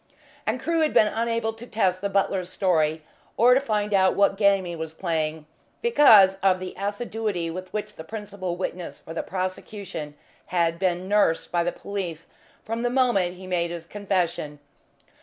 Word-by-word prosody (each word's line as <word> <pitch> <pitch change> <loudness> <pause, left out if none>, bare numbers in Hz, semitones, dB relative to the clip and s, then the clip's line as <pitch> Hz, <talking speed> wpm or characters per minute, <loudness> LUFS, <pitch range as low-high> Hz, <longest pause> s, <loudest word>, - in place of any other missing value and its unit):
And - - 0
Crewe 335 0 0
had 310 - +1
been - - +7
unable 230 +1 -1
to 225 +2 -11
test 185 -5 0
the 200 - -1
butler's 195 -2 0
story, 160 -5 +1 0.3
or 250 +3 +6
find 210 -5 -1
out 190 -1 +4
what 200 -1 +3
game 200 -2 +3
he 175 -1 -5
was 160 -1 -6
playing, 160 -3 -2 0.4
because 220 - +7
of 190 -1 +3
the 185 0 -6
assiduity 205 -3 -3
with 185 +2 -7
which 210 - -4
the 160 - -8
principal 200 -2 -5
witness 180 -1 -5
for 165 - -10
the 165 - -2
prosecution 185 -4 -5 0.3
had 170 -2 0
been 185 -1 0
"nursed" 200 -5 +2
by 175 -1 +2
the 175 - 0
police 175 -6 -5 0.4
from 230 +1 -3
the 245 - +1
moment 240 -9 +2
he 185 +1 -11
made 175 -2 0
his 170 -1 -6
confession. 180 -6 -2
190 Hz, 170 wpm, -25 LUFS, 175-210 Hz, 0.4 s, been